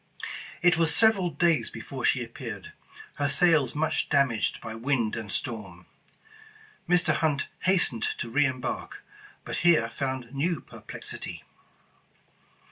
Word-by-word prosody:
It 175 -2 +5
was 160 -2 +3
sev 220 +3 +6
eral 175 -6 -3
days 170 -2 +3
before - - -7
she - - +3
appeared, - - -8 0.4
her 145 -1 +1
sails 150 -3 +4
much 155 +1 0
damaged 140 -6 +2
by 110 -1 -7
wind 115 -1 0
and 110 -3 -5
storm. 100 -10 -4 1.0
Mr. 180 0 +4
Hunt 150 -3 0 0.2
hastened 180 - +3
to - - -4
re 145 +4 +4
embark, 130 -1 -4 0.4
but - - -3
here 170 -9 +4
found 130 -1 -4
new 155 +3 0
perplexity. - - -8
140 Hz, 125 wpm, -27 LUFS, 120-170 Hz, 1.0 s, sev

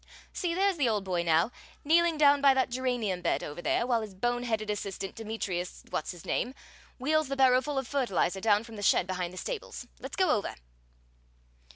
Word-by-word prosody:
See, 345 -3 -2
there's 390 -1 +2
the 270 -6 +2
old 210 -3 0
boy 180 -3 -1
now, 170 +5 +2 0.3
kneeling 330 +2 +3
down 285 -1 +5
by 275 -1 +6
that 260 -2 +1
geranium 240 -7 -1
bed - - 0
over 150 +4 -6
there, 235 - +1
while 240 -2 +1
his 210 -3 -8
bone 240 +5 0
headed 220 -3 -1
assistant, 195 -2 -4
Demetrius 205 -5 -4
What's - - -2
his 175 -3 -8
name, 255 - -1 0.4
wheels 310 +3 +1
the 275 - -2
barrowful 265 +2 +3
of 265 -2 -1
fertilizer 195 -9 0
down 210 0 +3
from 230 -2 -11
the - - -6
shed 200 - +4
behind 180 -2 -3
the 185 - -11
stables. 470 - -5
Let's - - -7
go 375 -5 +3
over." 210 - -1
235 Hz, 195 wpm, -29 LUFS, 195-275 Hz, 0.4 s, by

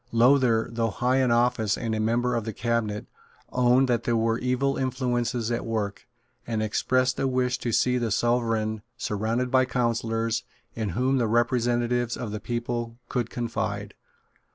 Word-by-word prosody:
Lowther, 120 -1 +4
though 115 -1 0
high 125 +4 +1
in 130 -2 +3
office 120 -3 +2
and 115 -2 -2
a 110 - -1
member 120 +3 +1
of 115 -2 0
the 110 0 -4
cabinet, 110 -3 -1 0.5
owned 125 +1 +4
that 120 -2 +1
there 120 -1 +1
were 115 0 +1
evil 130 +2 0
influences 125 -3 -1
at 120 - -1
work, 105 -3 -3 0.4
and 110 -2 -1
expressed 130 +4 +1
a 135 - +1
wish 125 -1 0
to 120 - -2
see 125 +2 +2
the 120 -2 -1
Sovereign 115 -1 0 0.2
surrounded 115 +5 -1
by 130 -1 +4
counsellors 115 -2 0 0.3
in 110 -3 -2
whom 130 +1 +2
the 120 - +1
representatives 120 +1 +1
of 115 -4 -5
the 105 - -4
people 120 0 -3
could 120 -3 -1
confide. 110 -4 -3
120 Hz, 160 wpm, -26 LUFS, 115-125 Hz, 0.5 s, Lowther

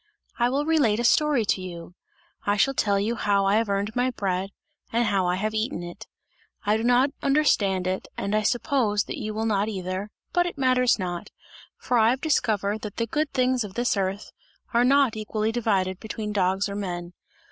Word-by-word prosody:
I 240 +1 +3
will 280 +3 0
relate 280 -10 +2
a - - 0
story 285 -1 +3
to 190 - 0
you; 175 -1 -8 0.5
I 205 0 +1
shall 270 +7 +3
tell 200 -6 +1
you 215 +4 0
how 200 -3 +1
I 200 +2 +3
have 225 -2 0
earned 200 +2 -1
my 250 +1 +2
bread, 195 -5 -2 0.4
and 235 +1 +2
how 195 -4 +1
I 180 - +1
have 215 +3 -2
eaten 220 -5 -2
it. 175 0 -9 0.6
I 210 +1 +3
do 220 - -1
not 245 +3 +3
understand 205 -10 +2
it 185 +1 -2
and 200 - -2
I 215 - +2
suppose 235 -2 +1
that - - -6
you 215 -1 -3
will 220 +1 -1
not 210 -1 +1
either, 190 0 -4 0.2
but 350 0 +2
it 345 - -6
matters 255 -2 +3
not, 175 -3 -4 0.5
for 245 -2 0
I 220 0 +5
have 255 +2 +1
discovered 220 -8 0
that 210 -2 -6
the 230 - 0
good 295 +6 -1
things 255 -1 +1
of 200 -2 -9
this 240 -1 +1
earth 195 +1 -2 0.4
are 235 +1 +4
not 270 -2 +4
equally 215 0 -2
divided 195 -5 0
between 215 -1 -5
dogs 190 0 +1
or 200 - -5
men. 175 -3 -5
215 Hz, 200 wpm, -25 LUFS, 195-245 Hz, 0.6 s, I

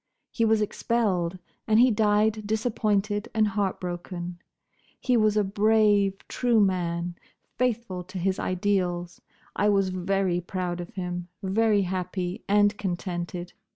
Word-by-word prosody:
He 230 - +1
was 220 -1 +3
expelled, 195 -6 0 0.3
and 220 0 +4
he 250 +1 +6
died 215 0 +2
disappointed 215 -1 0
and 215 -1 +3
heartbroken. 180 -3 -3 0.6
He 250 - +1
was 215 -2 +3
a 210 - +4
brave, 205 -1 +2
true 240 -3 +2
man, 175 -3 0 0.5
faithful 235 -7 -1
to 185 +1 -8
his 190 +1 0
ideals. 180 -2 -1 0.3
I 205 - +2
was 195 -2 +2
very 185 -1 0
proud 180 -1 -3
of 175 - -8
him; 180 -2 -4 0.2
very 205 +1 +2
happy 180 +1 -3
and 205 0 +4
contented. 175 -2 -4
195 Hz, 125 wpm, -26 LUFS, 180-215 Hz, 0.6 s, he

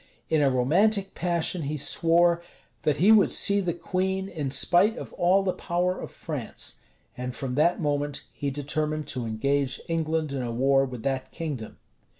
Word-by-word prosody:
In 155 -2 +3
a 140 - +4
romantic 190 - +2
passion 175 0 -1
he 150 +1 -3
swore, 170 +3 +3 0.4
"That 150 -2 +1
he 195 +8 +5
would 215 -2 +5
see 200 0 +4
the 180 -3 -1
queen, 190 +2 -2
in 150 -6 -3
spite 180 - +4
of - - -8
all 185 +3 +3
the 185 -1 0
power 180 +1 -1
of - - -6
France;" - - -6 0.4
and, 125 0 -5
from 130 -2 -4
that 160 +6 +2
moment, 145 -2 -2
he 140 - -3
determined 150 +2 -2
to 125 -3 -3
engage 135 +4 0
England 160 -2 -1
in 135 -2 -3
a 120 -1 -3
war 135 +3 +3
with 125 -4 -8
that 130 -1 -2
kingdom. 145 -10 -6
155 Hz, 170 wpm, -26 LUFS, 135-175 Hz, 0.4 s, he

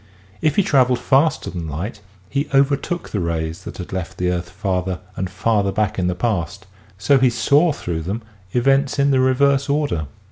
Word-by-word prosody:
If 155 -2 +2
he 200 - +4
traveled 130 -6 +3
faster 140 +6 +2
than 85 -2 -5
light 95 - -5 0.3
he 140 +5 -2
overtook 140 +5 +1
the 105 - -2
rays 85 +1 -3
that - - -7
had 90 0 -7
left 95 0 -4
the 90 0 0
earth 85 -1 -3
farther 95 -1 -2 0.2
and 95 -1 -3
farther 100 +1 +1
back 105 -1 -1
in 90 - +1
the 90 - 0
past 100 -2 -2 0.3
so 135 +8 +3
he 130 -1 +4
saw 145 +7 +3
through 85 - -4
them 100 +8 -4 0.3
events 135 +4 +2
in 140 0 +3
the 130 - +3
reverse 135 +2 +3
order. 140 - 0
105 Hz, 185 wpm, -20 LUFS, 90-140 Hz, 0.3 s, he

